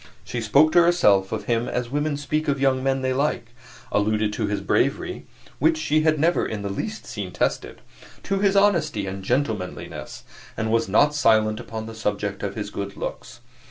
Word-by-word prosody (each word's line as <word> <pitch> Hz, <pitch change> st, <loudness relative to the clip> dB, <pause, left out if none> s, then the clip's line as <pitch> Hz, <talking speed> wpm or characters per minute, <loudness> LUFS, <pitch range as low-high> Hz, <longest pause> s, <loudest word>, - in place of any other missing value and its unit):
She 120 Hz, -, -4 dB
spoke 140 Hz, +8 st, +4 dB
to 175 Hz, -, +6 dB
herself 105 Hz, -, +3 dB
of 110 Hz, -, -3 dB
him 120 Hz, 0 st, 0 dB
as 125 Hz, -1 st, -3 dB
women 145 Hz, 0 st, -1 dB
speak 155 Hz, +2 st, -2 dB
of 140 Hz, -1 st, 0 dB
young 135 Hz, -1 st, +2 dB
men 135 Hz, 0 st, 0 dB
they 130 Hz, 0 st, +1 dB
like 130 Hz, -4 st, -1 dB, 0.4 s
alluded 105 Hz, 0 st, +1 dB
to 105 Hz, -1 st, -1 dB
his 105 Hz, 0 st, -1 dB
bravery -, -, -1 dB, 0.3 s
(which 160 Hz, +3 st, +3 dB
she 155 Hz, 0 st, +1 dB
had 155 Hz, 0 st, +2 dB
never 170 Hz, +4 st, +2 dB
in 105 Hz, -2 st, -4 dB
the 100 Hz, -, -3 dB
least 215 Hz, -, -5 dB
seen -, -, -6 dB
tested), -, -, -2 dB, 0.4 s
to 195 Hz, -1 st, -1 dB
his 200 Hz, 0 st, +2 dB
honesty 170 Hz, -, +2 dB
and 95 Hz, 0 st, -6 dB
gentlemanliness, 110 Hz, -5 st, -3 dB, 0.3 s
and 110 Hz, 0 st, -1 dB
was 115 Hz, -3 st, +1 dB
not 145 Hz, +9 st, +4 dB
silent 110 Hz, -6 st, +3 dB
upon 110 Hz, -1 st, -6 dB
the 115 Hz, -, -8 dB
subject 105 Hz, -2 st, -3 dB
of 100 Hz, -1 st, -4 dB
his 105 Hz, -1 st, -5 dB
good 100 Hz, 0 st, -5 dB
looks. -, -, -7 dB
120 Hz, 190 wpm, -23 LUFS, 105-155 Hz, 0.4 s, to